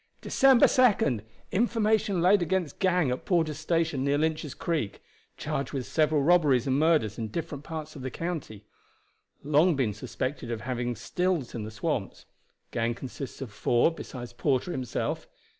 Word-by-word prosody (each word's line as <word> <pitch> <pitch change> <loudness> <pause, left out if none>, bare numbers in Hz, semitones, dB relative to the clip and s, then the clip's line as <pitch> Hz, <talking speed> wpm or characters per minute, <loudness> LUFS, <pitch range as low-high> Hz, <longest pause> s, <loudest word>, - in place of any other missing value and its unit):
"December 265 -2 +5
2nd. 200 - +3 0.3
Information 215 -3 +1
laid 190 +2 +5
against 175 -3 -1
gang 180 -8 +2
at 125 - -3
Porter's 160 -5 0
Station, 160 -4 0
near 140 +1 +2
Lynch's 155 -2 -1
Creek. 155 -12 -2 0.4
Charged 140 +1 -3
with 135 -3 -2
several 155 -2 +2
robberies 150 -7 +4
and 135 +1 +1
murders 155 -10 +2
in 110 - -2
different 150 +3 -5
parts 155 -1 -6
of 140 - -8
the 130 - -3
county. 145 - -5 0.8
Long 150 +4 +4
been 125 -6 0
suspected 125 +4 -4
of 115 -2 -3
having 120 0 -2
stills 170 - -1
in 110 -3 -4
the - - -6
swamps. 110 -2 -3 0.5
Gang 115 +1 0
consists 135 +1 -7
of 130 -5 -6
four 120 +8 +2
besides 120 -7 -8
Porter 135 +6 0
himself. 130 -6 -3
150 Hz, 155 wpm, -28 LUFS, 125-170 Hz, 0.8 s, December